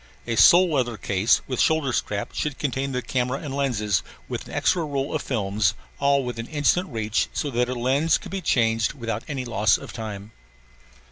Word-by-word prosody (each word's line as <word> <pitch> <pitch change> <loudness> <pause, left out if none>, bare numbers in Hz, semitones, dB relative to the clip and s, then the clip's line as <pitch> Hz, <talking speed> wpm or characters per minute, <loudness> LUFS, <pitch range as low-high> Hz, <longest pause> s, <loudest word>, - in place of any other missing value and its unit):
A 115 - -2
sole 175 +8 +6
leather 120 -5 0
case 100 +3 +2
with 130 - -4
shoulder 160 -5 +2
strap 100 -3 -2
should 150 -3 -2
contain 135 -1 -2
the 125 -1 -2
camera 125 +1 -1
and 145 -2 -6
lenses, 110 - 0 0.3
with - - -5
an - - -10
extra 175 -2 +2
roll 140 -2 -2
of - - -1
films, 105 -4 0 0.2
all 140 -1 +3
within 120 -1 -5
instant 160 +5 +1
reach, 110 -1 -1
so 145 - -2
that 125 0 0
a 125 - -2
lens 135 +6 +2
could - - -11
be 195 -1 -3
changed 115 -7 +1
without 115 -5 -4
any 135 -3 -4
loss 110 -4 +2
of - - -10
time. 105 -2 -7
125 Hz, 190 wpm, -24 LUFS, 110-140 Hz, 0.3 s, sole